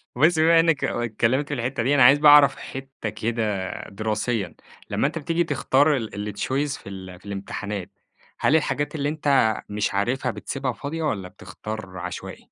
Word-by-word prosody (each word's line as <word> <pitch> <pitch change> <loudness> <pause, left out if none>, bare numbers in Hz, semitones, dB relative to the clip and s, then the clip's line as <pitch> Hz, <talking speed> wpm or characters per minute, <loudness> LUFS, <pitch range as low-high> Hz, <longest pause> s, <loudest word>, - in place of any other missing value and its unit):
بُصّ 160 +5 +4
بقى 160 - +4
بما 165 0 +6
إنك 165 -3 +2
اتكلّمت 120 +4 0
في 145 - -4
الحتّة 125 -1 -2
دي، 140 +5 +2
أنا 135 - +6
عايز 140 +4 +7
بقى 150 -1 +8
أعرف 145 -2 +7
حتّة 135 -4 -7
كده 105 -3 -2 0.2
دراسيًا، 110 -1 -2 0.3
لمّا - - +1
أنت 160 +3 -4
بتيجي 165 +3 0
تختار 145 0 +2
ال 105 -3 -5
الChoice 140 +5 -1
في - - -11
ال 95 -2 -9
في - - -22
الامتحانات، 100 0 -5 0.5
هل 150 - +3
الحاجات 150 -1 0
اللي 145 -1 -1
أنت 140 -7 +2
مش 105 0 -1
عارفها 125 +5 0
بتسيبها 135 +1 -3
فاضية، 160 +6 -5
والّا 100 -11 -2
بتختار 105 0 -8
عشوائي؟ 90 - -7
125 Hz, 175 wpm, -24 LUFS, 105-145 Hz, 0.5 s, بقى